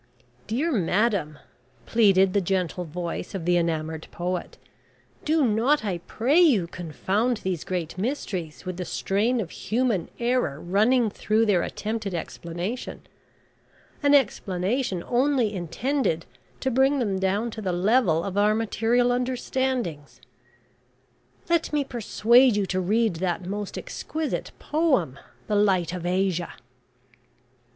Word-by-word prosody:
"Dear 280 +10 0
madam," 195 - +1 0.5
pleaded 195 -4 +4
the 200 - +3
gentle 180 -1 -1
voice 170 +4 -5
of 175 -4 -4
the 175 0 +3
enamoured 160 -2 -1
poet, 180 0 -4 0.7
"do 310 -2 +3
not, 230 +4 +2
I 185 -4 -2
pray 250 - +1
you, 270 - +5
confound 190 +8 -1
these 185 -4 -2
great 175 -3 -3
mysteries 190 - -4
with 185 -1 -4
the 185 - -3
strain 195 - 0
of 185 -7 -4
Human 225 -6 -1
Error 240 - 0
running 215 +6 +2
through 215 +3 +1
their 195 -5 +3
attempted 215 -2 -3
explanation 175 +7 -5 1.0
an 290 -1 +5
explanation 195 -4 0
only 250 -3 +1
intended 180 - -1 0.4
to 265 - 0
bring 265 +3 +3
them 205 -7 0
down 200 +5 0
to 220 - -7
the 190 -3 -1
level 180 -2 +2
of 200 0 -2
our 210 +1 +4
material 230 +2 +1
understandings. 250 - -2 1.3
Let 340 -1 +1
me 295 -1 +1
persuade 240 0 +3
you 205 -1 +1
to 185 0 -1
read 215 0 +1
that 180 0 -2
most 205 +2 -4
exquisite 315 -1 -4
poem 265 - 0 0.3
`The 205 -1 +3
Light 185 -4 +1
of 175 -1 -4
Asia.'" 180 -2 0
205 Hz, 130 wpm, -25 LUFS, 180-245 Hz, 1.3 s, you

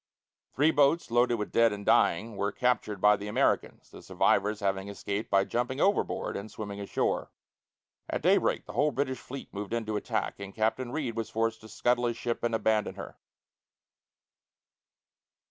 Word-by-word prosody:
Three 150 +4 +4
boats, 145 -1 +2
loaded 120 0 +3
with 105 -2 -4
dead 115 -1 +4
and 100 0 -6
dying, 110 +6 +3
were 100 +1 -1
captured 110 -4 0
by 105 +2 +6
the 100 0 -7
Americans, 105 - 0
the - - -12
survivors 105 +1 +1
having 95 0 -1
escaped 100 +1 -4
by 100 0 +4
jumping 125 +5 -2
overboard 215 +4 +1
and 100 +2 -5
swimming 100 -1 -7
ashore. 100 - -1 0.8
At - - -3
daybreak - - +2
the - - -9
whole 150 +1 +3
British 130 -1 -2
fleet 135 +1 -9
moved 100 +2 -5
in 115 -1 -1
to 110 -1 -2
attack, - - -3
and 100 -1 -8
Captain 115 +3 0
Reid 130 -6 -3
was 115 -1 -3
forced 115 0 -1
to 110 - -13
scuttle 120 +3 +1
his 120 -1 -2
ship 120 -1 -3
and 115 -1 +1
abandon 110 -1 +1
her. - - -8
115 Hz, 170 wpm, -29 LUFS, 105-125 Hz, 0.8 s, by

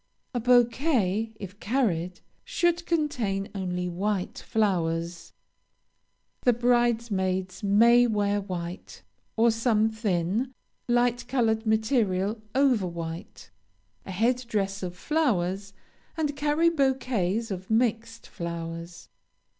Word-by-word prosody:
A 245 - 0
bouquet, 235 - +2
if 200 0 -9
carried, 185 -8 -1 0.2
should 345 0 0
contain 235 -12 -1
only 180 -2 -2
white 190 +2 -2
flowers. 170 -5 -1 1.1
The 245 - +4
bridesmaids 225 -6 +1
may 235 +4 +5
wear 205 -2 +1
white, 175 - -7 0.3
or 230 +1 +5
some 225 -1 +2
thin, 215 +3 -1 0.3
light 240 0 +1
colored 225 -4 +1
material 220 -2 +1
over 260 -8 +3
white, 165 - -7 0.5
a - - -12
head 240 +6 +1
dress 200 -3 -1
of 180 -1 -5
flowers, 195 - 0 0.5
and 300 -3 -1
carry 300 +3 +2
bouquets 245 - 0
of 185 0 -5
mixed 230 0 0
flowers. 170 0 -6
220 Hz, 100 wpm, -27 LUFS, 185-245 Hz, 1.1 s, may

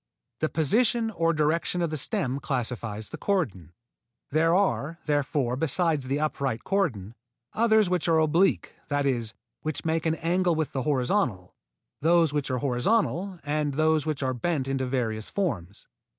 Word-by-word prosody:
The 155 - 0
position 225 - +1
or 165 -5 +1
direction 165 +3 0
of 165 - -1
the - - -2
stem 135 -2 0
classifies 115 -5 -3
the 160 - -8
cordon. 115 - -1 0.6
There 165 +3 +3
are, 170 -5 +1
therefore, 145 -4 0
besides 155 -1 0
the 140 +2 0
upright 140 -6 -1
cordon, 115 - -1 0.4
others 220 -2 +4
which 180 -2 0
are 165 -1 +4
oblique, 165 +4 +2
that 145 -1 0
is, 120 -5 -1 0.3
which 155 0 -3
make 165 0 0
an 160 - +1
angle 175 +1 +1
with 155 -1 -1
the 135 - -2
horizontal, 125 - 0 0.5
those 165 -1 +4
which 145 -2 -1
are 130 - 0
horizontal, 180 - 0
and 150 -1 -1
those 155 0 +2
which 150 -3 -2
are 130 -1 0
bent 135 +2 -1
into 135 -1 -1
various 115 -4 -2
forms. 105 - -3
150 Hz, 155 wpm, -27 LUFS, 130-170 Hz, 0.6 s, others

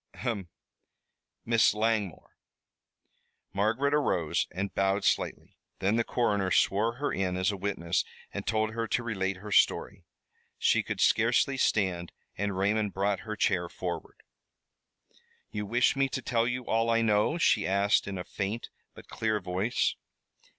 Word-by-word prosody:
ahem! 105 -8 -3 1.0
Miss 115 -2 +4
Langmore!" 105 -4 -1 1.2
Margaret 115 +8 +1
arose 95 - +1
and 95 +3 -4
bowed 95 +1 +1
slightly. - - -1 0.2
Then 100 +3 +1
the 115 - +2
coroner 105 -6 0
swore 110 +5 +2
her 145 +4 -2
in 90 -1 -1
as 95 +2 +1
a - - -4
witness 95 -4 -1 0.3
and - - -5
told 110 0 +1
her 115 0 -2
to 120 - 0
relate 100 -4 -1
her 105 +3 -9
story. - - +2 0.5
She - - +3
could - - -4
scarcely 120 +4 +3
stand 95 -8 0 0.2
and 100 -1 -2
Raymond 105 +1 0
brought 100 0 0
her 105 - -2
chair 85 -4 +1
forward. - - -6 1.3
"You 105 0 -4
wish 120 +5 +3
me 135 0 +1
to 130 - -3
tell 115 -2 +1
all 115 -1 0
I 115 0 +3
know?" 105 +8 +2
she 110 -10 +3
asked, 100 +2 +2
in 100 -1 -4
a 90 - -4
faint 105 +6 -4 0.3
but - - -13
clear 110 -1 -1
voice. 95 +6 0
105 Hz, 145 wpm, -29 LUFS, 95-115 Hz, 1.3 s, Miss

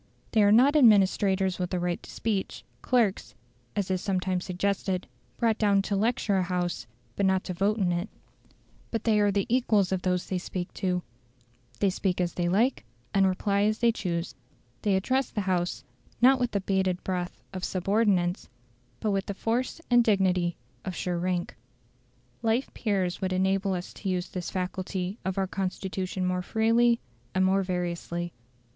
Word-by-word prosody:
They 220 - +4
are 205 0 +5
not 260 +7 +6
administrators 195 -6 +4
with 180 -1 -2
a - - 0
right 175 0 -1
to - - -13
speech 210 -4 -2 0.2
clerks 235 -6 +1 0.4
(as 195 -2 -1
is 185 -1 0
sometimes 185 -2 -1
suggested) 185 0 -1 0.3
brought 225 -2 +1
down 200 -2 +3
to 200 - -1
lecture 210 -1 +1
a - - +2
House, 175 -9 -2 0.3
but 200 - -1
not 190 0 +2
to 185 - -4
vote 200 +5 +1
in 185 -4 +1
it; 175 +5 -2 0.8
but 225 -2 -2
they 215 -2 +3
are 205 -1 +3
the 200 0 0
equals 225 -6 +2
of 190 -1 0
those 180 -1 0
they 185 - -2
speak 180 0 -5
to; 180 -2 -1 0.8
they 200 - +3
speak 185 -1 -1
as 175 -1 0
they 175 -1 0
like, 230 +8 +2 0.3
and 195 -1 +4
reply 200 +2 +1
as 215 +1 +2
they 235 -1 +4
choose; 170 -8 -3 0.5
they 205 -2 +2
address 255 +7 +1
the 210 - -2
House, 180 -2 -1 0.4
not 260 +2 +6
with 245 -1 +1
the 200 -3 -1
"bated 190 -2 0
breath" 180 -1 -3
of 185 -1 -5
subordinates, 190 -1 +1 0.5
but 215 - +1
with 195 -1 -1
the 200 - -3
force 240 - -1
and 240 0 +6
dignity 185 -5 +2 0.3
of 185 -2 -4
sure 175 -1 -2
rank. 180 0 -2 0.9
Life 230 +4 0
peers 190 -5 -1
would 185 -1 -1
enable 190 +1 +1
us 180 0 -6
to 195 - -5
use 180 -1 -1
this 180 -2 -4
faculty 185 +1 -3
of 190 0 -2
our 195 - +2
Constitution 190 0 -3
more 180 0 0
freely 230 +4 +3 0.4
and 185 0 +3
more 195 +1 +3
variously. 175 -2 -3
190 Hz, 175 wpm, -28 LUFS, 180-210 Hz, 0.9 s, not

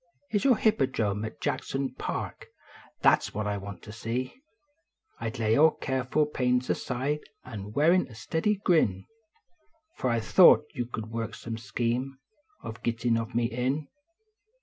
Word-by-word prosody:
Is 205 -2 +1
your 255 -5 +5
hippodrome 115 - +1
at 110 - -8
Jackson 135 -1 -2
Park, - - -5 0.6
that - - +6
s - - -8
what 105 0 -1
I 105 0 -1
want 100 0 -9
to 105 - -9
see; 120 - -4 0.8
I 115 - -2
d - - -8
lay 110 +1 +3
all 155 +4 +7
careful 130 +1 0
pains 125 -3 0
aside 135 +4 -1 0.2
an 105 -5 -7
wear 150 +7 +4
a 180 -11 0
steady 160 - 0
grin 160 - +2 0.9
F - - -4
I 120 -2 +2
thought 150 - +6
at - - -32
you 120 -3 -2
could 110 -2 -6
work 115 0 -3
some 115 -1 -6
scheme 125 +4 -2 0.5
Of 110 -1 -7
gittin 115 0 0
of 115 +1 -3
me 120 0 +2
in. 130 +5 -1
125 Hz, 160 wpm, -28 LUFS, 115-140 Hz, 0.9 s, all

